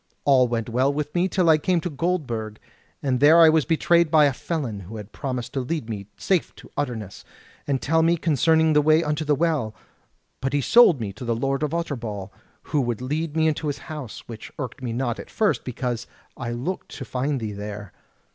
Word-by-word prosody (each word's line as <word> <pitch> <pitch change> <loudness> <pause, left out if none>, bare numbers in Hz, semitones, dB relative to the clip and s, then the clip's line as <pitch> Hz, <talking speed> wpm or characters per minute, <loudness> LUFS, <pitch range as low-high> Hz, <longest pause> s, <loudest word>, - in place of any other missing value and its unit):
All 130 -3 +5
went 115 -2 -2
well 130 +4 +2
with 150 +1 -3
me, 175 +1 +2
till 185 -2 +1
I 155 -1 +6
came 180 +3 +1
to 175 - -3
Goldburg, 135 -10 -2 0.5
and 130 -3 +1
there 155 +4 +7
I 165 -1 +9
was 155 -2 +3
betrayed 170 0 +3
by 155 -1 +6
a 140 - +2
felon, 145 -6 -3
who 100 +4 -9
had 105 0 -9
promised 125 -3 -4
to 135 - -1
lead 125 -2 -3
me 100 -2 -6
safe 185 -4 0
to - - -15
Utterness, 115 -9 -4 0.4
and 140 -2 +1
tell 160 +4 +2
me 170 +1 +3
concerning 160 0 +3
the 150 - +5
way 155 +2 +4
unto 150 0 -1
the 150 -1 +2
Well. 145 -9 0 0.7
But 135 +1 -2
he 145 - +2
sold 190 - +6
me 105 -4 -4
to 105 - -9
the 120 -1 0
Lord 135 +4 -1
of 150 +1 -1
Utterbol, 115 - -4 0.3
who 145 - 0
would 120 -3 -2
lead 150 +4 -3
me 160 -1 +3
to 150 +1 -5
his 145 - -2 0.2
house; 140 -8 -8
which 115 -2 -9
irked 130 0 -6
me 125 -2 -3
not, 120 0 -2
at - - -9
first, 215 -2 +1
because 125 -1 -3 0.3
I 120 -2 -5
looked 125 +11 -4
to 135 - -6
find 135 +3 -1
thee 110 -2 -4
there. 105 -1 -7
140 Hz, 215 wpm, -24 LUFS, 120-160 Hz, 0.7 s, I